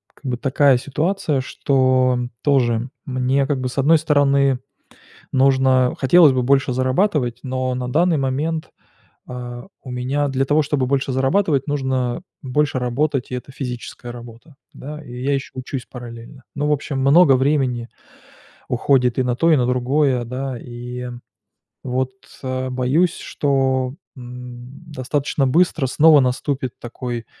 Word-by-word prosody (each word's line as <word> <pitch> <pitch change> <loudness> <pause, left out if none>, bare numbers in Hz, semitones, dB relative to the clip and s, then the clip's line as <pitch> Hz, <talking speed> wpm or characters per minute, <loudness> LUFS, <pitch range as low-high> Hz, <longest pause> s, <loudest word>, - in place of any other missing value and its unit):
как - - -22
бы 120 - -2
такая 135 +1 +3
ситуация, 150 +3 -1
что 130 -1 +2 0.2
тоже 125 -4 +2 0.2
мне 130 0 +1
как 140 -2 -1
бы, 130 - -2
с 125 - -10
одной 155 +4 +5
стороны, 140 -3 +2 0.7
нужно 130 -1 +3
хотелось 150 +1 +6
бы 130 - +1
больше 135 0 +2
зарабатывать, 130 - 0
но 130 -1 -2
на 125 0 -3
данный 170 +3 +3
момент, 145 +4 -2 0.6
а, 120 -1 -7 0.2
у 130 - -9
меня 130 +4 -1
для 135 0 0
того, 150 +2 +3
чтобы 145 -3 -1
больше 135 0 0
зарабатывать, 135 +2 +1
нужно 130 -2 -1 0.2
больше 145 +1 0
работать, 135 +2 -1
и - - -4
это 125 +2 -9
физическая 125 -2 -6
работа, 120 +5 -12 0.2
да. 150 +2 -8
И 125 +1 -8
я 140 +2 +1
ещё 135 - -3
учусь 130 0 -5
параллельно. 120 +1 -10
Ну, 145 +1 0
в - - +2
общем, 145 -1 -2
много 140 +2 +6
времени 130 -3 0 0.8
уходит 125 -1 +2
и - - +3
на 125 -1 0
то, 165 +6 +3
и - - +6
на 125 -3 +1
другое, 125 +1 +1
да. 130 +1 -4
И 125 +1 -7 0.8
вот, 130 0 -1 0.3
а, 130 0 -2
боюсь, 130 +7 +1
что, 130 -2 0 0.2
м, 125 +1 -10
достаточно 135 +1 -1
быстро 160 0 +2
снова 155 +2 +6
наступит 130 0 -2
такой 120 -1 -6
130 Hz, 145 wpm, -20 LUFS, 125-145 Hz, 0.8 s, хотелось